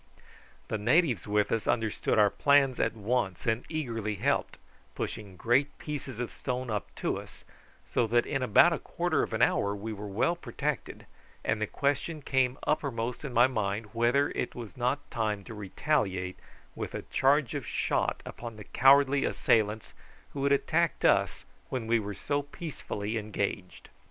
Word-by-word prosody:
The 110 Hz, -, -1 dB
natives 125 Hz, -, +2 dB
with 105 Hz, 0 st, +1 dB
us 115 Hz, -, 0 dB
understood 110 Hz, -2 st, 0 dB
our 105 Hz, -2 st, +5 dB
plans 140 Hz, -3 st, +3 dB
at -, -, +1 dB
once, 110 Hz, -3 st, -1 dB
and 115 Hz, +1 st, +1 dB
eagerly 115 Hz, -9 st, -2 dB
helped, -, -, 0 dB, 0.4 s
pushing 100 Hz, -4 st, -5 dB
great 130 Hz, +7 st, +2 dB
pieces 140 Hz, -5 st, -6 dB
of 125 Hz, -, -3 dB
stone 125 Hz, -2 st, -3 dB
up 105 Hz, -1 st, -2 dB
to -, -, -1 dB
us, -, -, -13 dB, 0.4 s
so 115 Hz, -, +1 dB
that 120 Hz, +2 st, +3 dB
in 135 Hz, -, -1 dB
about 130 Hz, +8 st, +6 dB
a 160 Hz, -, -2 dB
quarter 170 Hz, -3 st, 0 dB
of -, -, -2 dB
an 110 Hz, +2 st, +2 dB
hour 100 Hz, -3 st, +2 dB
we 110 Hz, +2 st, -5 dB
were 105 Hz, 0 st, -7 dB
well 105 Hz, -, +1 dB
protected, 150 Hz, -4 st, -4 dB, 0.4 s
and 110 Hz, 0 st, 0 dB
the 110 Hz, -, +1 dB
question 145 Hz, +4 st, -1 dB
came 130 Hz, -1 st, +1 dB
uppermost 125 Hz, -6 st, -1 dB
in 140 Hz, -, -4 dB
my 120 Hz, 0 st, +6 dB
mind 105 Hz, -3 st, -2 dB
whether 120 Hz, +5 st, +2 dB
it -, -, -3 dB
was 115 Hz, -7 st, -8 dB
not 130 Hz, +4 st, -1 dB
time 105 Hz, -4 st, -1 dB
to 110 Hz, -, -9 dB
retaliate 95 Hz, -3 st, -1 dB, 0.3 s
with -, -, -5 dB
a -, -, -4 dB
charge 135 Hz, -1 st, +2 dB
of 145 Hz, -3 st, -3 dB
shot -, -, 0 dB
upon 115 Hz, -1 st, -7 dB
the 105 Hz, -, -9 dB
cowardly 135 Hz, +4 st, +5 dB
assailants, 110 Hz, -1 st, +1 dB, 0.4 s
who 140 Hz, -, -3 dB
had 140 Hz, -, +3 dB
attacked 160 Hz, +4 st, +1 dB
us -, -, +3 dB, 0.2 s
when 125 Hz, -3 st, -3 dB
we 115 Hz, +1 st, +3 dB
were 105 Hz, -1 st, -5 dB
so 145 Hz, 0 st, -1 dB
peacefully 125 Hz, -, -5 dB
engaged. 100 Hz, -3 st, -4 dB
120 Hz, 165 wpm, -29 LUFS, 105-140 Hz, 0.4 s, about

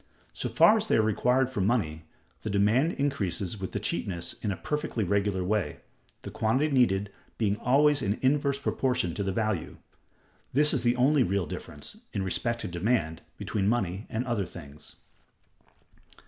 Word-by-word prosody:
So -, -, -3 dB
far 220 Hz, -, +6 dB
as 215 Hz, 0 st, -2 dB
they -, -, +3 dB
are -, -, +5 dB
required 125 Hz, +4 st, +2 dB
for 120 Hz, -, -2 dB
money, 85 Hz, -7 st, 0 dB, 0.4 s
the -, -, -4 dB
demand 105 Hz, -, +2 dB
increases 105 Hz, -, -2 dB
with 95 Hz, -, -5 dB
the -, -, -2 dB
cheapness 85 Hz, -3 st, -2 dB
in 105 Hz, -, -1 dB
a 95 Hz, -, -4 dB
perfectly 150 Hz, -7 st, -2 dB
regular 100 Hz, 0 st, 0 dB
way, 105 Hz, +1 st, -1 dB, 0.4 s
the -, -, -7 dB
quantity 130 Hz, +8 st, +1 dB
needed 105 Hz, -7 st, +2 dB, 0.3 s
being 105 Hz, -3 st, +1 dB
always 145 Hz, +4 st, +3 dB
in 100 Hz, -2 st, 0 dB
inverse 140 Hz, +1 st, +2 dB
proportion 125 Hz, -10 st, -1 dB
to 100 Hz, -, -3 dB
the 95 Hz, -1 st, -1 dB
value. 105 Hz, -3 st, -2 dB, 0.8 s
This 150 Hz, +3 st, +5 dB
is 135 Hz, -, +1 dB
the 120 Hz, +1 st, +2 dB
only 135 Hz, +3 st, +3 dB
real 100 Hz, -4 st, +1 dB
difference, -, -, -8 dB, 0.2 s
in 100 Hz, -, -1 dB
respect 115 Hz, +5 st, -1 dB
to -, -, -4 dB
demand, 85 Hz, -2 st, -1 dB, 0.2 s
between 100 Hz, -2 st, -1 dB
money 100 Hz, -4 st, -1 dB
and 120 Hz, +2 st, -2 dB
other 115 Hz, -7 st, -1 dB
things. 75 Hz, -4 st, -12 dB
110 Hz, 165 wpm, -28 LUFS, 95-130 Hz, 0.8 s, far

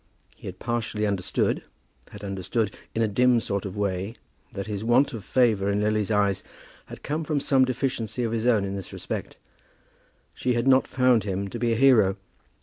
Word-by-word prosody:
He -, -, -11 dB
had -, -, -7 dB
partially 115 Hz, -2 st, -2 dB
understood, 100 Hz, -3 st, 0 dB, 0.5 s
had -, -, -11 dB
understood 100 Hz, +2 st, -2 dB, 0.2 s
in 115 Hz, -, +2 dB
a -, -, +2 dB
dim 125 Hz, +3 st, +3 dB
sort 100 Hz, -3 st, -3 dB
of 95 Hz, +2 st, -8 dB
way, 100 Hz, +2 st, -2 dB, 0.4 s
that 100 Hz, -, -5 dB
his 105 Hz, -1 st, -4 dB
want 125 Hz, +5 st, +3 dB
of 110 Hz, -4 st, -6 dB
favour 110 Hz, -4 st, +2 dB
in 100 Hz, 0 st, +1 dB
Lily's 105 Hz, 0 st, 0 dB
eyes 100 Hz, -3 st, +1 dB, 0.4 s
had -, -, -11 dB
come 155 Hz, +3 st, -2 dB
from 150 Hz, -1 st, 0 dB
some 135 Hz, -1 st, +3 dB
deficiency 125 Hz, -2 st, -2 dB
of 115 Hz, -, -1 dB
his 115 Hz, +1 st, -1 dB
own 110 Hz, -5 st, +3 dB
in 100 Hz, 0 st, -4 dB
this 95 Hz, -2 st, -7 dB
respect. -, -, -6 dB, 1.0 s
She 125 Hz, -1 st, -1 dB
had 120 Hz, +2 st, 0 dB
not 130 Hz, 0 st, +5 dB
found 125 Hz, -4 st, +3 dB
him 100 Hz, 0 st, -3 dB
to 120 Hz, -, -6 dB
be 120 Hz, 0 st, +1 dB
a -, -, +2 dB
hero. 110 Hz, -6 st, +5 dB
110 Hz, 190 wpm, -25 LUFS, 100-125 Hz, 1.0 s, not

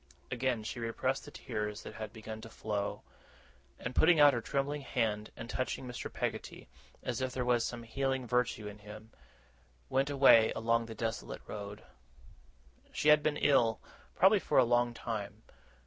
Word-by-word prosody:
Again 125 Hz, -2 st, 0 dB
she 115 Hz, -, -5 dB
repressed 115 Hz, -1 st, -1 dB
the -, -, -9 dB
tears 105 Hz, -1 st, -4 dB
that -, -, -8 dB
had 110 Hz, -1 st, -6 dB
begun 110 Hz, -1 st, -8 dB
to 115 Hz, -, -10 dB
flow; 105 Hz, -2 st, -3 dB, 0.7 s
and, 125 Hz, -, -5 dB
putting 160 Hz, +2 st, +5 dB
out 145 Hz, -1 st, +8 dB
her 120 Hz, -, -1 dB
trembling 140 Hz, +4 st, -2 dB
hand, 110 Hz, -5 st, -1 dB
and 115 Hz, -, -7 dB
touching 130 Hz, +1 st, -3 dB
Mr. 125 Hz, -1 st, -6 dB
Peggotty, -, -, -4 dB, 0.4 s
as -, -, -2 dB
if 130 Hz, -1 st, -2 dB
there 125 Hz, -1 st, -2 dB
was 120 Hz, -1 st, +3 dB
some 120 Hz, -1 st, -4 dB
healing 135 Hz, +2 st, -1 dB
virtue 125 Hz, -3 st, 0 dB
in 105 Hz, 0 st, -9 dB
him, 105 Hz, +2 st, -11 dB, 0.8 s
went 135 Hz, +2 st, +1 dB
away 135 Hz, -5 st, +6 dB
along 115 Hz, +1 st, +1 dB
the 115 Hz, -, -8 dB
desolate 110 Hz, -1 st, -4 dB
road. 105 Hz, 0 st, -7 dB, 1.1 s
She 150 Hz, -, +1 dB
had 150 Hz, 0 st, +7 dB
been 150 Hz, 0 st, 0 dB
ill, 120 Hz, -7 st, +3 dB, 0.4 s
probably 195 Hz, +3 st, +5 dB
for -, -, 0 dB
a 130 Hz, -, +7 dB
long 120 Hz, 0 st, +2 dB
time. 110 Hz, -2 st, -5 dB
120 Hz, 165 wpm, -32 LUFS, 110-130 Hz, 1.1 s, out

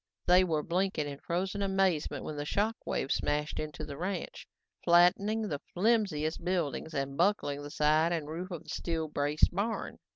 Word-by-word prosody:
They 180 Hz, +1 st, +6 dB
were 160 Hz, -4 st, 0 dB
blinking 180 Hz, -3 st, 0 dB
in 140 Hz, -1 st, -6 dB
frozen 190 Hz, +4 st, -2 dB
amazement 190 Hz, -5 st, +1 dB
when 155 Hz, -, -5 dB
the 145 Hz, -, -3 dB
shock 210 Hz, +8 st, 0 dB
wave 135 Hz, -, -1 dB
smashed 150 Hz, +1 st, 0 dB
into 155 Hz, 0 st, -5 dB
the 145 Hz, -1 st, -7 dB
ranch, 185 Hz, +2 st, -4 dB, 0.4 s
flattening 180 Hz, +6 st, +4 dB
the 150 Hz, -9 st, -3 dB
flimsier 195 Hz, -7 st, +2 dB
buildings 165 Hz, -4 st, -1 dB
and 135 Hz, 0 st, -2 dB
buckling 170 Hz, -5 st, +1 dB
the 145 Hz, -, -7 dB
side 155 Hz, +3 st, +3 dB
and 160 Hz, -4 st, -2 dB
roof 170 Hz, +4 st, -5 dB
of 175 Hz, -4 st, -6 dB
the -, -, -15 dB
steel 165 Hz, -2 st, -2 dB
braced 145 Hz, +2 st, +2 dB
barn. 210 Hz, +5 st, -2 dB
170 Hz, 170 wpm, -31 LUFS, 150-190 Hz, 0.4 s, They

